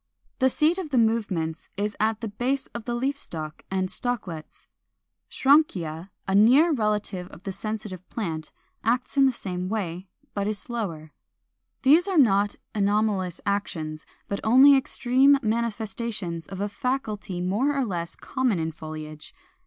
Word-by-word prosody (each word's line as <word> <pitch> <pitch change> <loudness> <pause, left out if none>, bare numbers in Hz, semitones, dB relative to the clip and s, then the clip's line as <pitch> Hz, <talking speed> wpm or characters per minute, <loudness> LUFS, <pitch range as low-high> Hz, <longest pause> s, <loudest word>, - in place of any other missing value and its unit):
The 260 -1 +4
seat 315 +7 +2
of 350 -5 -5
the 265 - 0
movements 205 -9 0
is 205 +1 -1
at 220 +1 +1
the 225 - -2
base 250 +6 -1
of 235 -2 -6
the 240 - -2
leaf 265 +4 0
stalk 155 - -6
and 190 -1 0
stalklets. 195 -7 -4 0.6
Schrankia, 190 - +2 0.2
a 190 - 0
near 255 - +6
relative 210 -6 -1
of 180 - -14
the 195 - -3
Sensitive 210 -3 -6
Plant, 160 -8 -4 0.3
acts 250 +4 0
in 275 -1 +6
the - - +3
same 185 -6 -4
way, 190 -4 -3 0.3
but 200 0 -1
is 215 -1 -1
slower. 185 -11 -5 0.7
These 315 +8 +6
are 380 -3 0
not 205 -6 +4 0.2
anomalous 200 -3 +1
actions, 160 -6 -3 0.2
but 200 - -2
only 265 +5 +7
extreme 265 +1 +4
manifestations 215 -5 -2
of 190 -1 -7
a 205 - 0
faculty 215 -6 -3
more 220 +11 +1
or 270 - +1
less 170 -5 -4
common 260 -7 0
in 160 0 -1
foliage. 155 -1 -9
210 Hz, 150 wpm, -26 LUFS, 180-250 Hz, 0.7 s, only